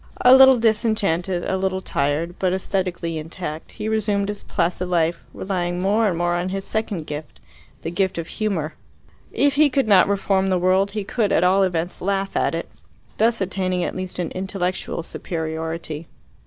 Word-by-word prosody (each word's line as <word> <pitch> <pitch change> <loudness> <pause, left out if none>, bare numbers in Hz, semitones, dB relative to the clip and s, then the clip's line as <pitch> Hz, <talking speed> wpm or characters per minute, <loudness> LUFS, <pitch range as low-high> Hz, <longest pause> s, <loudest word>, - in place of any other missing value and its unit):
A 250 - +8
little 265 -1 +8
disenchanted, 210 -6 +1
a 190 - 0
little 190 0 -1
tired, 155 0 -1
but 185 -1 +1
aesthetically 180 -3 -2
intact, 160 0 -7
he 215 -1 -5
resumed 205 -2 0
his 205 - -4
placid 180 +1 -1
life, 170 -1 +1
relying 180 -2 -2
more 210 +4 +2
and 180 -4 0
more 175 0 +1
on 175 +1 -1
his 195 +1 -4
second 210 -7 -3
gift, 150 0 -7 0.4
the 165 - -3
gift 190 +1 0
of 170 - -3
humour. 175 -8 -2 0.6
If 285 -1 +2
he 300 0 +5
could 270 -2 +1
not 195 -3 +6
reform 195 -1 +1
the 185 -1 +2
world, 190 +2 +2
he 210 -2 -2
could 210 0 0
at - - +3
all 185 +2 +4
events 175 -2 -1
laugh 195 +1 -1
at - - +1
it, - - -4 0.5
thus 225 -1 +2
attaining 185 -1 -1
at - - -3
least 185 0 -5
an 175 -3 -2
intellectual 185 -2 -3
superiority. 160 -1 -4
185 Hz, 175 wpm, -22 LUFS, 170-200 Hz, 0.6 s, A